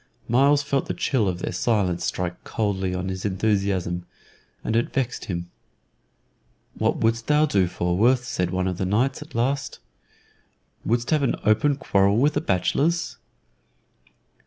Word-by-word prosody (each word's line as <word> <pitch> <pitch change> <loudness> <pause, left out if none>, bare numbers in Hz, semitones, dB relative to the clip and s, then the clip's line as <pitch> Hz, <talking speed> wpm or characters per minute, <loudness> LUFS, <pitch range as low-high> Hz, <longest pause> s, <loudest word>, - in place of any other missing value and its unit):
Myles 140 +4 +4
felt 140 -1 -1
the - - -3
chill 120 -7 +1
of 90 -2 -1
their - - -2
silence 90 -7 0
strike 90 0 -3
coldly 95 -4 -1
on 90 0 -3
his 95 0 -5
enthusiasm, 95 -3 0 0.6
and 110 - -1
it 115 - +1
vexed 130 -2 -2
him. 85 -2 -5 1.2
"What - - 0
wouldst 115 +1 0
thou 150 +1 +4
do, 100 -10 +2
Falworth?" 100 +9 +2
said 115 -8 -2
one 90 +1 -1
of 90 -2 -2
the 95 - 0
knights, 125 +9 +1
at 150 -2 -11
last. 135 +4 -1 1.1
"Wouldst 120 +1 0
have 155 -2 +3
us 135 - 0
open 110 +7 +3
a - - -3
quarrel 100 -6 +2
with 145 +5 +3
the 145 - 0
bachelors?" 155 - 0
110 Hz, 155 wpm, -24 LUFS, 95-135 Hz, 1.2 s, Myles